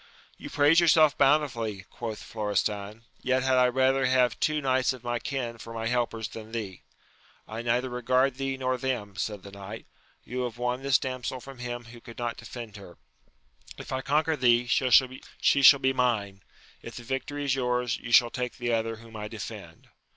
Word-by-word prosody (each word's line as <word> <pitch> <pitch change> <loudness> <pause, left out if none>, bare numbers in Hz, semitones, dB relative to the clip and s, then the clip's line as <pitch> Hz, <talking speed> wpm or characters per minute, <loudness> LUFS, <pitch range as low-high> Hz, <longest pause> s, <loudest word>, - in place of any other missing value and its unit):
You - - -9
praise 150 +3 +5
yourself 155 -3 +5
bountifully, 120 -9 +1
quoth 115 -3 -6
Florestan; 105 0 -2 0.2
yet 130 0 +1
had 130 -1 +2
I 125 0 +5
rather 130 +1 +2
have 125 -2 +2
two 155 0 +1
knights 130 -2 +1
of 125 -2 -12
my 120 0 -2
kill 120 -4 -4
for 115 0 -9
my 115 0 -3
helpers 115 -2 -1
than 110 -1 -10
thee! 100 -6 -5 0.7
I 110 +1 -5
neither 120 +2 0
regard 125 +1 +1
thee 135 -1 -2
nor 130 -1 -1
them, 120 -6 -3
said 105 -1 -4
the 100 - -10
knight: 100 -1 -9 0.4
you 125 +2 -4
have 120 -1 -6
won 125 +1 -2
this 135 0 +4
damsel 130 0 -4
from 135 0 -12
him 120 0 -5
who 120 +1 -13
could 115 - -12
not 120 -1 -3
defend 115 -2 -9
her; 95 -3 -13 0.8
if - - -9
I 130 0 -1
conquer 150 +3 +1
thee, 120 -3 +3
she 130 +2 +2
shall 140 +1 +9
be 130 0 +1
mine; 105 -6 0 0.4
if - - -9
the 120 - -8
victory 135 +3 -4
is 135 - +2
yours, 125 -3 0
you 120 - -8
shall 120 0 +6
take 125 -2 -4
the 120 -2 -1
other 115 0 -1
whom 115 0 -14
I 105 -1 -5
defend. 105 -6 -9
125 Hz, 190 wpm, -27 LUFS, 115-130 Hz, 0.8 s, shall